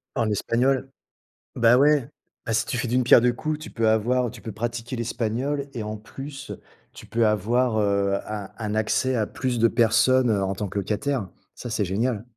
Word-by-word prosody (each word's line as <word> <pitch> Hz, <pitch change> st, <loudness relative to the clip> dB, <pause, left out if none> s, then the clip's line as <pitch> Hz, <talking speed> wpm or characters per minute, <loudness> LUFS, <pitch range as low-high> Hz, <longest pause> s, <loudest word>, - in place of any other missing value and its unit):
En 115 Hz, -4 st, +1 dB
espagnol. 130 Hz, +6 st, 0 dB, 0.6 s
Bah 120 Hz, +1 st, +5 dB
ouais, 145 Hz, -2 st, +4 dB, 0.4 s
bah 115 Hz, -, -1 dB
si 115 Hz, +2 st, +1 dB
tu 125 Hz, -, -2 dB
fais 120 Hz, -, -2 dB
d'une 125 Hz, +2 st, +2 dB
pierre 120 Hz, -, +7 dB
deux 125 Hz, 0 st, +3 dB
coups, 155 Hz, +5 st, -3 dB
tu 155 Hz, -, -10 dB
peux 115 Hz, -1 st, +1 dB
avoir 120 Hz, +3 st, +2 dB
tu -, -, -12 dB
peux 110 Hz, -, -6 dB
pratiquer 120 Hz, +3 st, -4 dB
l'espagnol 120 Hz, +5 st, -2 dB
et 115 Hz, -, -4 dB
en 105 Hz, 0 st, -4 dB
plus, 135 Hz, +5 st, -9 dB, 0.4 s
tu -, -, -12 dB
peux 115 Hz, 0 st, +1 dB
avoir, 110 Hz, +3 st, +1 dB
heu, 100 Hz, -1 st, +1 dB
un 105 Hz, -2 st, -5 dB
un 110 Hz, -2 st, -3 dB
accès 110 Hz, +4 st, +1 dB
à 110 Hz, -3 st, +1 dB
plus 130 Hz, +2 st, -3 dB
de 115 Hz, 0 st, +4 dB
personnes, 120 Hz, +2 st, +3 dB
heu, 100 Hz, -3 st, +1 dB
en 95 Hz, 0 st, -1 dB
tant 100 Hz, +1 st, -4 dB
que 100 Hz, -, -6 dB
locataire. 110 Hz, +3 st, -1 dB, 0.3 s
Ça, 120 Hz, -, -7 dB
c'est 110 Hz, -2 st, 0 dB
génial! 110 Hz, +3 st, -1 dB
115 Hz, 200 wpm, -24 LUFS, 110-125 Hz, 0.6 s, pierre